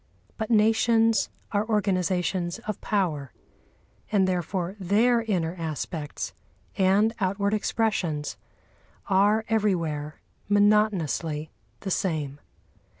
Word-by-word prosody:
But 220 -2 -4
nations 225 0 +3 0.2
are 205 -1 +1
organisations 185 -3 0
of 215 -2 -4
power, 160 - -1 0.8
and 195 -3 +3
therefore 180 +1 -2
their 225 +6 +3
inner 180 -7 -1
aspects 155 -1 -4 0.4
and 200 +3 +3
outward 200 +1 0
expressions 200 -9 -1 0.8
are 205 +3 +4
everywhere 170 -9 -1 0.3
monotonously 200 -7 +2 0.3
the 195 - -4
same. 150 -7 -1
190 Hz, 90 wpm, -26 LUFS, 165-215 Hz, 0.8 s, are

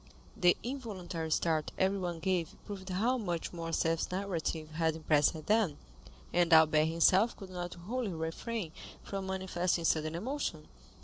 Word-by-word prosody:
The 175 0 +4
involuntary 195 -11 -4
start 160 -1 +1
everyone 185 -3 0
gave 180 -3 0
proved 195 -2 -7
how 230 +8 +1
much 175 -6 -3
Morcerf's 165 -1 0
narrative 170 -4 -2
had 160 0 +1
impressed 155 0 +2
them, 210 -8 +2 0.6
and 175 0 +3
Albert 155 -1 +6
himself 185 +7 +4
could 195 -2 -9
not 175 -1 -5
wholly 220 +7 -3
refrain 165 +4 -3 0.3
from 195 -1 -4
manifesting 185 -2 -1
sudden 155 0 +1
emotion. 200 - -3
175 Hz, 130 wpm, -32 LUFS, 160-195 Hz, 0.6 s, Albert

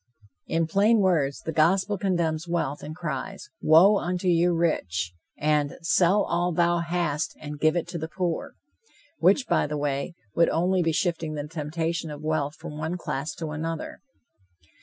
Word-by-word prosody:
In 165 0 +1
plain 200 +7 +3
words, 165 -9 +1
the 160 - -4
gospel 185 +6 +2
condemns 170 -4 -1
wealth, 155 -4 -2
and 155 +2 -7
cries, 150 -6 -5
"Woe 185 +6 +6
unto 180 +1 -2
you 175 0 +4
rich," 90 - 0 0.2
and 150 -1 +1
"Sell 185 +4 +3
all 175 +1 0
thou 175 +1 +2
hast 170 -3 -1
and 150 -1 -7
give 155 +2 +3
it 175 - -1
to 170 - -4
the 160 - -4
poor," 185 - -3 0.6
which, 205 +8 +4
by - - +2
the 150 0 -3
way, 145 +3 -2 0.2
would 170 - +4
only 180 +3 +1
be 165 -1 +1
shifting 160 -2 -1
the 145 0 -4
temptation 160 +1 -3
of 150 0 -8
wealth 155 -1 -1
from 150 -1 -8
one 160 +3 -2
class 150 -3 -4
to 160 -2 -5
another. 160 +1 -4
165 Hz, 165 wpm, -26 LUFS, 150-175 Hz, 0.6 s, Woe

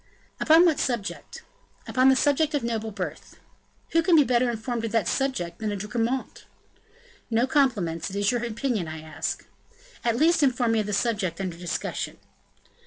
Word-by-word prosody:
"Upon 325 +3 +6
what 320 -5 +3
subject?" 235 -6 -3 0.4
"Upon 260 +1 +4
the 265 - +5
subject 290 +3 +2
of 285 - -1
noble 225 -1 -2
birth." 180 -7 -7 0.5
"Who 330 - +4
can 340 +1 +4
be 300 - +7
better 250 -1 +2
informed 235 0 -3
on 230 - -1
that 220 -4 +1
subject 180 -12 -1
than 215 -1 -2
a - - -2
De 200 +1 -5
Gramont?" 235 +4 -2 0.9
"No 230 +1 +2
compliments; 225 - +1
it 195 - -8
is 205 +2 +2
your 240 -1 -1
opinion 230 - -2
I 155 0 -6
ask." 155 0 -4 0.6
"At 235 -1 +1
least, 325 +3 +4
inform 250 -4 +2
me 225 - +2
of 210 - -2
the 210 - -3
subject 200 -6 0
under 185 -3 -3
discussion." 175 0 -4
230 Hz, 175 wpm, -26 LUFS, 200-265 Hz, 0.9 s, be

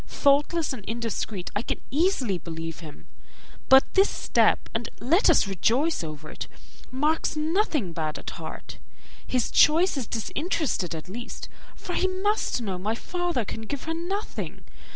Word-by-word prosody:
Thoughtless 290 +3 +2
and 215 - -7
indiscreet 225 -4 -3
I 205 - +1
can - - -3
easily 275 - +1
believe 165 0 -6
him, 155 -4 -11 0.6
but 265 0 +7
this 390 +1 +5
step - - +2
(and 230 +1 -2
let 325 - +4
us - - +5
rejoice 235 - +1
over 155 -1 -7
it) - - -6 0.4
marks 300 +6 0
nothing 305 - 0
bad 155 -1 -2
at - - -6
heart. - - -8 0.5
His 250 -2 0
choice 330 +2 +5
is 250 -5 -2
disinterested 240 - -1
at 160 - -7
least, 235 +6 -7 0.3
for 355 - -6
he 375 - +2
must 380 - 0
know 190 -4 -3
my 215 +4 -1
father 350 - -2
can 225 - -5
give 255 +5 -5
her 325 - -2
nothing. 375 +6 -4
255 Hz, 150 wpm, -26 LUFS, 195-330 Hz, 0.6 s, but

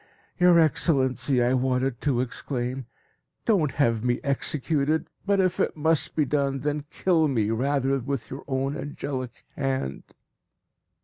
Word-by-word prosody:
"Your 180 -1 +6
Excellency," 130 -5 +2
I 125 +1 +2
wanted 130 -1 0
to 130 -4 +1
exclaim, 125 0 -4 0.6
"don't 175 - +2
have 115 -6 +1
me 125 0 +1
executed, 150 +2 0 0.2
but 200 -1 +3
if 185 -1 +1
it - - 0
must 160 0 +2
be 150 - +2
done, 140 -1 0
then 150 +1 -2
kill 165 -4 +2
me 110 -6 0
rather 135 +3 +1
with 130 -3 -4
your 135 - -6
own 135 +1 -1
angelic 130 -4 -5
hand." 130 - -3
135 Hz, 135 wpm, -26 LUFS, 125-150 Hz, 0.6 s, Your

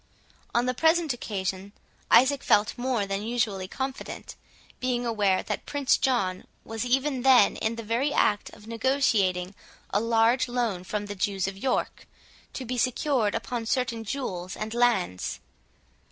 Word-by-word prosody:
On 240 +1 +3
the 255 - 0
present 320 +1 +3
occasion, 195 -3 -4 0.4
Isaac 270 +2 +5
felt 205 +1 +3
more 245 -4 -1
than 195 0 -2
usually 215 -4 -1
confident, 265 +5 -6 0.4
being 245 -1 -1
aware 205 -5 +1
that 210 - -4
Prince 285 -2 +2
John 195 -9 0 0.2
was 225 0 -4
even 265 +2 +1
then 255 -5 +6
in 220 +1 -1
the 230 - -6
very 235 +7 0
act 205 -6 +2
of 210 - -15
negotiating 220 -7 +1 0.4
a 205 - +2
large 230 +3 +3
loan 235 -7 -1
from 205 +2 -3
the 205 - -5
Jews 195 -1 -1
of 195 - -4
York, 250 +6 -2 0.5
to 260 - -5
be 250 +1 -3
secured 255 -3 +1
upon 230 0 -3
certain 235 -3 -1
jewels 190 -7 -4
and 215 +1 -4
lands. 235 - +1
230 Hz, 150 wpm, -27 LUFS, 205-255 Hz, 0.5 s, then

